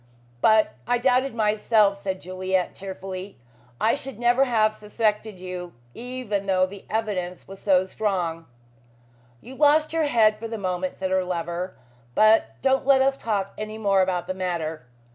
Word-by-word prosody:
"But 220 0 +4
I 245 - +3
doubted 255 +1 +2
myself," 210 -2 +2
said 190 -2 -3
Juliet 185 0 -1
tearfully. 190 0 -7 0.4
"I 225 - +3
should 270 -4 -5
never 240 +3 +3
have 215 -4 +2
suspected 210 -1 -2
you, 180 -1 -6 0.2
even 240 -5 -4
though 185 -1 +3
the 195 +1 -11
evidence 195 -5 -3
was 195 0 -10
so 190 -2 +3
strong." 180 -5 -2 0.9
"You 255 - -11
lost 300 +3 +3
your 325 -1 +2
head 220 -6 +3
for 230 - -5
the 225 0 -5
moment," 185 -2 -3
said 190 0 -3
her 190 0 +2
lover, 175 +1 -4 0.4
"but 215 +1 +4
don't 265 0 +2
let 270 -1 +6
us 270 0 +2
talk 205 -6 -2
any 215 0 -5
more 200 -3 +3
about 180 -2 0
the 185 - -3
matter. 165 -7 -3
205 Hz, 160 wpm, -24 LUFS, 185-230 Hz, 0.9 s, let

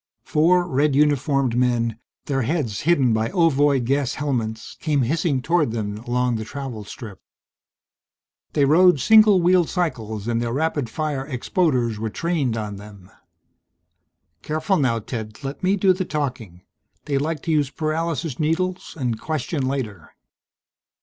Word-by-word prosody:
Four 175 +3 +3
red 145 -2 +1
uniformed 140 -3 +2
men, 120 -2 +1 0.3
their 135 -2 0
heads 125 -5 -1
hidden 135 -9 +4
by 110 +1 0
ovoid 145 -7 +2
gas 135 0 0
helmets, 115 -6 -3
came 145 -4 +1
hissing 145 0 0
toward 165 -3 +2
them 105 -2 -3
along 120 0 0
the 110 - -4
travel 130 -3 -6
strip. 105 -3 -10 1.3
They 145 - +3
rode 175 +2 +5
single 215 - +6
wheeled 175 -1 +3
cycles 110 - -3
and 115 0 0
their 120 -1 -2
rapid 145 -3 -1
fire 145 -1 -3
expoders 125 - 0
were 110 0 -2
trained 145 -4 -1
on 105 -2 -4
them. 100 -2 -13 1.3
"Careful 155 +5 0
now, 125 -5 +1
Ted. 110 0 -7
Let 135 +1 -5
me 190 +2 +2
do 190 -1 +4
the 185 +1 -2
talking. 125 - -4 0.4
They 140 -2 0
like 155 0 -3
to 165 - -1
use 150 -3 +2
paralysis 155 -2 -2
needles 180 +4 -1
and 120 -4 -2
question 155 -2 -2
later." 115 - -5
140 Hz, 145 wpm, -22 LUFS, 115-160 Hz, 1.3 s, single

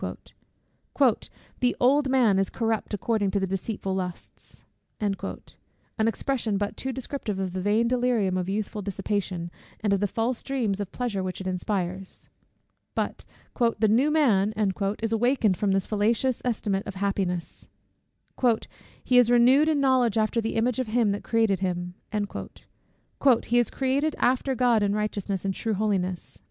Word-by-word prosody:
"The 250 -1 +2
old 275 +2 +3
man 235 -7 +4
is 195 - +1
corrupt 225 -2 -1
according 205 -1 0
to 200 - 0
the 190 - 0
deceitful 195 +1 -3
lusts;" 180 -2 -7 0.4
an 205 -2 0 0.8
expression 225 -1 0
but 205 +1 -2
too 265 - -3
descriptive 255 -6 -4
of 185 -2 -2
the 185 - -2
vain 210 +4 +2
delirium 240 -6 +1
of 185 0 -2
youthful 210 +1 -3
dissipation, 190 -3 -3 0.3
and 210 -2 +1
of 200 - +2
the 205 - +1
false 230 +5 -1
dreams 235 -8 -1
of 200 -3 -4
pleasure 235 -6 -2
which 185 -1 -4
it 190 - -7
inspires; 185 0 -3 0.7
but - - -3 0.5
"the 220 +1 +3
new 240 +8 +3
man" 220 -10 +3 0.5
is 225 - 0
awakened 230 -3 +2
from 200 +2 0
this 195 -1 +1
fallacious 230 +4 +1
estimate 210 -5 -1
of 195 - -6
happiness; 190 -3 -2 1.3
"he 250 -1 +5
is 240 -2 +4
renewed 255 +6 +5
in 305 -2 +2
knowledge 255 -5 +3
after 220 +2 +1
the 225 - -3
image 235 +2 +1
of 255 - -1
him 220 -1 +2
that 200 - -3
created 225 -5 +2
him" 180 -2 -2 1.5
"He 240 +1 +3
is 240 - +1
created 280 +3 0
after 260 +1 +1
God 240 -3 +3
in 205 0 +1
righteousness 205 -2 -2
and 195 - 0
true 220 +2 -2
holiness." 190 -3 -2
215 Hz, 150 wpm, -26 LUFS, 195-245 Hz, 1.5 s, he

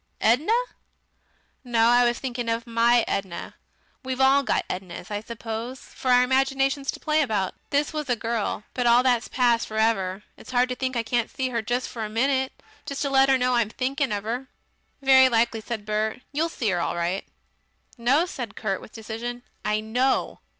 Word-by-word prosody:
Edna?" 280 - +3 1.1
"No. 235 -2 +3
I 245 0 +5
was 240 0 +1
thinking 245 -3 -3
of 230 +2 -1
MY 235 0 +3
Edna. 190 -3 -3 0.5
We've 260 0 -4
all 270 +1 +5
got 270 - 0
Ednas, 180 0 -6
I 205 0 -2
suppose, 230 +2 -6
for 260 - -6
our 250 0 +6
imaginations 270 +1 +1
to - - -2
play 310 0 +2
about. 210 -9 0 0.2
This 290 +2 0
was 300 -3 -4
a 245 - +3
girl. 225 -2 -2
But 245 -1 0
all 240 +1 +6
that's 245 -3 +2
past 240 -2 +2
for 215 - -6
ever. 205 -3 +1
It's - - -14
hard 250 0 +2
to 250 - -2
think 260 0 -2
I 230 - 0
can't 235 0 0
see 260 -1 -2
her 235 -2 -1
just 240 +3 -1
for 225 - -5
a 215 - -4
minute 260 +4 +1 0.4
just 280 +1 -3
let 270 -1 +4
her 265 - +5
know 250 0 +1
I'm 235 -3 +2
thinking 265 +3 -1
of 205 -1 -2
her." 245 +4 -3 0.6
"Very 265 -1 +7
likely," 230 -1 +1
said 220 -2 -5
Bert, 215 +2 -1
"you'll 315 +4 0
see 225 - -1
'er 175 - 0
all 170 - -1
right." 175 +3 -1 0.7
"No," 265 +8 +3
said 245 - -6
Kurt 195 -4 -2
with - - -13
decision, 235 +2 -6 0.2
"I 210 0 0
KNOW." 250 +5 0
240 Hz, 190 wpm, -25 LUFS, 220-265 Hz, 1.1 s, Very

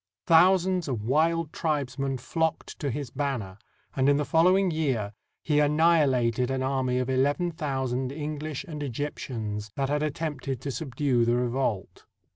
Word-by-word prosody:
Thousands 180 +1 +4
of 120 -6 -3
wild 160 +5 +1
tribes 145 -5 -2
men 135 -1 -1
flocked 160 +6 -2
to 145 - -2
his 135 0 -4
banner, 125 -9 -3 0.4
and 135 +1 +3
in 140 - +4
the 150 - 0
following 185 +4 +4
year 130 -10 -1 0.3
he 150 -1 +2
annihilated 145 -6 +3
an 130 0 -1
army 130 -1 0
of 125 -1 0
eleven 145 +7 +1
thousand 130 -5 -2
English 150 +1 -4
and 155 -6 -7
Egyp 145 +2 -3
tians 105 -4 -5
that 135 -1 -1
had 145 +1 0
attempted 145 -4 -3
to 140 - -3
subdue 130 -2 0
the 120 +1 +2
revolt. 120 -5 -2
140 Hz, 155 wpm, -27 LUFS, 125-155 Hz, 0.4 s, Thousands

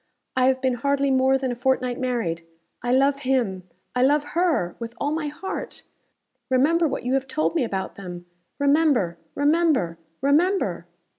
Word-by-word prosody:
I 255 0 +3
have 260 0 +1
been 260 -1 +2
hardly 280 +3 +1
more 265 0 +4
than 265 -1 -2
a - - -3
fortnight 255 0 0
married. 230 -10 -2 0.4
I 245 - -1
love 275 +2 +3
him 235 -9 -1 0.3
I 250 - +2
love 285 +3 +4
her 330 - +1
with 230 0 -6
all 285 - 0
my 310 -1 -2
heart. 305 +6 -6 0.7
Remember 310 +6 +3
what 275 - -3
you 250 +1 -1
have 270 0 0
told 310 +3 0
me 330 - +1
about 190 -5 -3
them. 175 -3 -8 0.3
Remember! 280 - +2 0.2
remember! 285 - +2 0.2
remember!" 280 - +1
265 Hz, 160 wpm, -24 LUFS, 235-290 Hz, 0.7 s, more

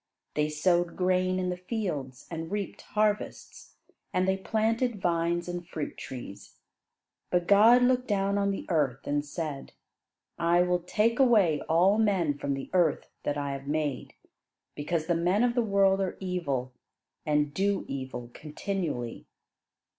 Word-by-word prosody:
They 150 0 +1
sowed 175 +3 +1
grain 185 0 +1
in 180 -1 -1
the 180 - -4
fields 180 - -4
and 165 +1 -5
reaped 205 -1 -4
harvests, 210 -1 -2 0.4
and 185 +1 +1
they 190 - +3
planted 225 +3 0
vines 170 -1 0
and 175 -1 -5
fruit 155 -4 -5
trees. 120 -6 -9 0.7
But 175 -1 +1
God 225 +5 +7
looked 250 0 +2
down 200 -1 +1
on 200 0 +1
the 195 - -3
earth 145 -7 0
and 145 0 0
said: 150 -2 -5 0.7
"I 170 +1 +4
will 180 0 +1
take 215 +7 +1
away 210 - +4
all 185 +6 +4
men 190 -9 +2
from 140 -1 -2
the 135 - -7
earth 175 -5 +2
that 145 - -2
I 140 -1 -2
have 135 0 -6
made; 150 -2 -2 0.6
because 155 +2 -2
the 175 - +1
men 180 +6 +2
of 245 -1 +2
the 240 - +2
world 195 -3 +3
are 190 -2 -2
evil, 145 -9 -2 0.5
and 150 -1 +1
do 200 +3 0
evil 130 -3 -6
continually." 150 - -4
175 Hz, 150 wpm, -28 LUFS, 150-200 Hz, 0.7 s, God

